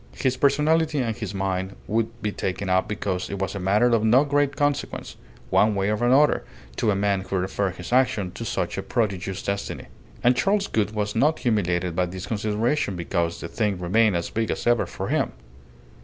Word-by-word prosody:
His 130 Hz, -1 st, 0 dB
personality 150 Hz, +3 st, +2 dB
and 115 Hz, -5 st, 0 dB
his 100 Hz, -2 st, -5 dB
mine 95 Hz, 0 st, -2 dB
would 110 Hz, +1 st, -2 dB
be 105 Hz, -, 0 dB
taken 95 Hz, 0 st, -3 dB
up 95 Hz, 0 st, +2 dB
because 95 Hz, -3 st, -3 dB
it 100 Hz, -, -4 dB
was 95 Hz, -1 st, -2 dB
a 100 Hz, -, -4 dB
matter 100 Hz, +5 st, +3 dB
of 115 Hz, -3 st, +3 dB
no 120 Hz, +5 st, +5 dB
great 145 Hz, -1 st, +1 dB
consequence, 145 Hz, -1 st, -2 dB, 0.4 s
one 105 Hz, 0 st, +4 dB
way 100 Hz, +1 st, +1 dB
or 105 Hz, +2 st, -1 dB
another, 135 Hz, +5 st, +4 dB, 0.3 s
to 110 Hz, -, +1 dB
a 100 Hz, -, +3 dB
man 100 Hz, -1 st, +1 dB
who 95 Hz, -, -4 dB
referred 95 Hz, +1 st, -1 dB
his 90 Hz, +6 st, -6 dB
action 110 Hz, -8 st, +2 dB
to -, -, -7 dB
such -, -, -2 dB
a -, -, -1 dB
prodigious 95 Hz, -4 st, -2 dB
destiny. 100 Hz, -10 st, -4 dB, 0.3 s
And 125 Hz, +1 st, +5 dB
Charles 195 Hz, +11 st, +2 dB
Gould 110 Hz, -, -1 dB
was 105 Hz, -1 st, -2 dB
not 150 Hz, +7 st, +3 dB
humiliated 90 Hz, -7 st, 0 dB
by 90 Hz, 0 st, +1 dB
this 90 Hz, +1 st, -6 dB
consideration, 110 Hz, +1 st, 0 dB
because 85 Hz, -1 st, -2 dB
the -, -, -4 dB
thing 105 Hz, 0 st, -1 dB
remained 100 Hz, +4 st, +2 dB
as 85 Hz, 0 st, -2 dB
big 110 Hz, -1 st, -1 dB
as -, -, -3 dB
ever 120 Hz, -1 st, +3 dB
for -, -, -5 dB
him. -, -, 0 dB
105 Hz, 200 wpm, -24 LUFS, 95-120 Hz, 0.4 s, no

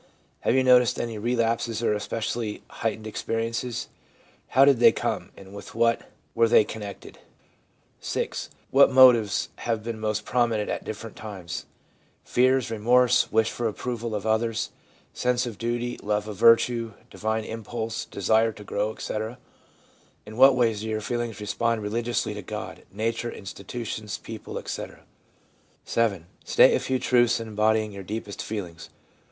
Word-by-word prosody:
Have -, -, +1 dB
you 130 Hz, -, +4 dB
noticed 125 Hz, -2 st, +5 dB
any 115 Hz, -2 st, -3 dB
relapses 115 Hz, 0 st, 0 dB
or 110 Hz, -, +2 dB
especially 105 Hz, +1 st, -3 dB
heightened 110 Hz, -1 st, -3 dB
experi 115 Hz, +1 st, -2 dB
ences? 115 Hz, 0 st, -3 dB, 0.6 s
How 135 Hz, +2 st, +5 dB
did 140 Hz, -4 st, +5 dB
they 115 Hz, -1 st, +8 dB
come, -, -, -3 dB
and 95 Hz, 0 st, -13 dB
with 100 Hz, -1 st, -10 dB
what 115 Hz, 0 st, +1 dB, 0.2 s
were 115 Hz, 0 st, +4 dB
they 110 Hz, -, +6 dB
connected? 105 Hz, -2 st, -8 dB, 0.8 s
'VI. -, -, -2 dB, 0.4 s
What 140 Hz, 0 st, +6 dB
motives 125 Hz, -6 st, +6 dB
have 115 Hz, -2 st, -2 dB
been 115 Hz, -1 st, -5 dB
most 105 Hz, -1 st, -2 dB
prominent 115 Hz, -4 st, +1 dB
at -, -, -3 dB
different 110 Hz, 0 st, -7 dB
times 95 Hz, -6 st, -7 dB, 0.3 s
— -, -, -38 dB
fears, 130 Hz, -1 st, +3 dB
remorse, 120 Hz, +3 st, +3 dB
wish 110 Hz, 0 st, +2 dB
for 120 Hz, -, -2 dB
approval 115 Hz, 0 st, -4 dB
of 105 Hz, 0 st, -4 dB
others, 110 Hz, +1 st, 0 dB, 0.4 s
sense 125 Hz, 0 st, 0 dB
of 115 Hz, -4 st, -7 dB
duty, 120 Hz, +1 st, -2 dB
love 105 Hz, 0 st, -1 dB
of 105 Hz, -, -5 dB
virtue, 115 Hz, +1 st, +4 dB, 0.2 s
divine 110 Hz, 0 st, -2 dB
impulse, 115 Hz, +1 st, -4 dB
desire 110 Hz, +3 st, +2 dB
to 105 Hz, -, -11 dB
grow, 105 Hz, +1 st, -1 dB
etc.? 110 Hz, +3 st, -4 dB, 0.9 s
In 110 Hz, -, -10 dB
what 130 Hz, +2 st, +7 dB
ways 115 Hz, -4 st, +2 dB
do 110 Hz, -, -5 dB
your 110 Hz, -1 st, -2 dB
feelings 120 Hz, -1 st, -3 dB
respond 110 Hz, +2 st, -1 dB
religiously 115 Hz, +1 st, -1 dB
to 105 Hz, -, -6 dB
God, 105 Hz, +3 st, -7 dB
nature, 115 Hz, +1 st, -2 dB
institutions, 105 Hz, +2 st, -6 dB
people, 110 Hz, -2 st, -8 dB
etc.? -, -, -6 dB, 0.8 s
'VII. 100 Hz, -8 st, 0 dB, 0.2 s
State -, -, +5 dB
a -, -, +2 dB
few 130 Hz, -, -1 dB
truths 120 Hz, -2 st, +3 dB
embodying 110 Hz, -1 st, +1 dB
your 100 Hz, -1 st, -8 dB
deepest 105 Hz, +1 st, -5 dB
feelings. 90 Hz, -6 st, -6 dB
115 Hz, 150 wpm, -26 LUFS, 105-120 Hz, 0.9 s, they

